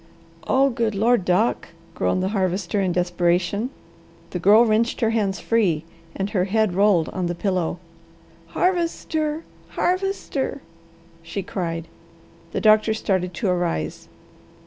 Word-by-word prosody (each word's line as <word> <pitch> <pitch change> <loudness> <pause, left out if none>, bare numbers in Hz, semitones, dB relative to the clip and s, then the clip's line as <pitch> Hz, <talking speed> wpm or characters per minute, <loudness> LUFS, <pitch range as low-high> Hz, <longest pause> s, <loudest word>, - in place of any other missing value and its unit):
"Oh 270 +1 +3
good 230 -3 -1
Lord, 225 -1 +2
Doc!" 185 +6 +1 0.3
groaned 90 - 0
the 190 - 0
Harvester 190 -1 -1
in 185 -2 +1
desperation. 180 +5 0 0.6
The 180 - -3
Girl 210 +6 +6
wrenched 225 +2 +1
her 225 -1 +2
hands 200 -5 0
free 190 -9 +1 0.3
and 195 +1 -3
her 185 -3 +1
head 215 -1 +1
rolled 190 -4 +3
on 185 -2 -2
the 175 - -2
pillow. 180 -3 -1 0.7
"Harvester! 320 - -1 0.3
Harvester!" 365 -7 -1 0.6
she 170 +4 -5
cried. 165 -3 -4 0.6
The - - -2
doctor 215 0 +4
started 185 -5 -1
to 205 -1 -1
arise. 175 - -2
200 Hz, 125 wpm, -23 LUFS, 180-230 Hz, 0.7 s, Girl